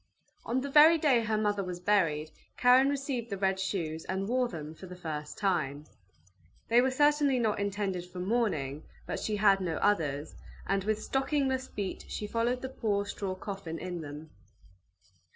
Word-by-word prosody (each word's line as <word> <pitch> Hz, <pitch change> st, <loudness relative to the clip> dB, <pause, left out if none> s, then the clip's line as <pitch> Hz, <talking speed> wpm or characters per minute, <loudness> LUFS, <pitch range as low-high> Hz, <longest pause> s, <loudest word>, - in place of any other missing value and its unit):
On 250 Hz, +2 st, 0 dB
the 280 Hz, -, -4 dB
very 310 Hz, +3 st, +8 dB
day 285 Hz, -6 st, +4 dB
her 220 Hz, -1 st, 0 dB
mother 205 Hz, -2 st, 0 dB
was 180 Hz, -1 st, -5 dB
buried, 165 Hz, -6 st, +1 dB, 0.3 s
Karen 255 Hz, +2 st, +6 dB
received 270 Hz, -4 st, -2 dB
the 200 Hz, -, -3 dB
red 190 Hz, 0 st, +1 dB
shoes, 165 Hz, -5 st, -2 dB
and 190 Hz, +1 st, -2 dB
wore 250 Hz, +2 st, +1 dB
them 155 Hz, -7 st, -7 dB
for 185 Hz, +4 st, -11 dB
the 180 Hz, -, -9 dB
first 155 Hz, -4 st, -6 dB
time. 155 Hz, -7 st, -1 dB, 0.8 s
They 235 Hz, +2 st, +6 dB
were 260 Hz, -, +2 dB
certainly 290 Hz, 0 st, +3 dB
not 220 Hz, -4 st, +1 dB
intended 195 Hz, -3 st, -2 dB
for 180 Hz, -, -11 dB
mourning, 180 Hz, -, -1 dB, 0.2 s
but -, -, -3 dB
she 215 Hz, -, -2 dB
had 200 Hz, -1 st, +4 dB
no 170 Hz, -3 st, -1 dB
others, 155 Hz, -8 st, 0 dB, 0.3 s
and 195 Hz, -1 st, 0 dB
with 215 Hz, 0 st, 0 dB
stockingless 270 Hz, -1 st, 0 dB
feet 200 Hz, -2 st, -5 dB
she 210 Hz, -, -4 dB
followed 235 Hz, +4 st, -1 dB
the 260 Hz, -, -3 dB
poor 205 Hz, -6 st, -1 dB
straw 200 Hz, -2 st, -4 dB
coffin 185 Hz, -4 st, -6 dB
in 175 Hz, -1 st, -5 dB
them. 150 Hz, +1 st, -9 dB
200 Hz, 170 wpm, -30 LUFS, 175-245 Hz, 0.8 s, very